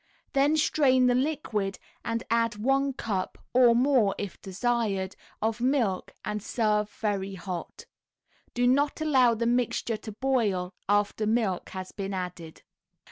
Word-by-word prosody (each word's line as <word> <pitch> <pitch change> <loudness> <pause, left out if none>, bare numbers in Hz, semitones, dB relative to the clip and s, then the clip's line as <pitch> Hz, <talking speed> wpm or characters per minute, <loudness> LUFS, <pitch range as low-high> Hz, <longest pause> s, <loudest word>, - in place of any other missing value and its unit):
Then 285 +3 +3
strain 260 -4 +3
the 250 - +4
liquid 245 -8 -1 0.3
and 230 0 -2
add 230 -1 +2
one 270 +6 +1
cup 205 -7 -3 0.2
(or 245 -2 +6
more 245 -5 +3
if 200 -3 -6
desired) 200 -2 -1 0.3
of 225 +1 -1
milk, 245 -8 0
and 210 +1 -2
serve 210 -1 0
very 200 -3 -3
hot. 180 -1 -6 0.7
Do 245 0 +2
not 280 +5 +2
allow 260 -7 +4
the 235 +1 -1
mixture 240 -1 0
to 215 - -8
boil 210 -7 0 0.2
after 205 +1 +1
milk 215 -5 0
has 185 -1 -7
been 195 -1 -4
added. 180 -3 -6
225 Hz, 135 wpm, -27 LUFS, 195-255 Hz, 0.7 s, or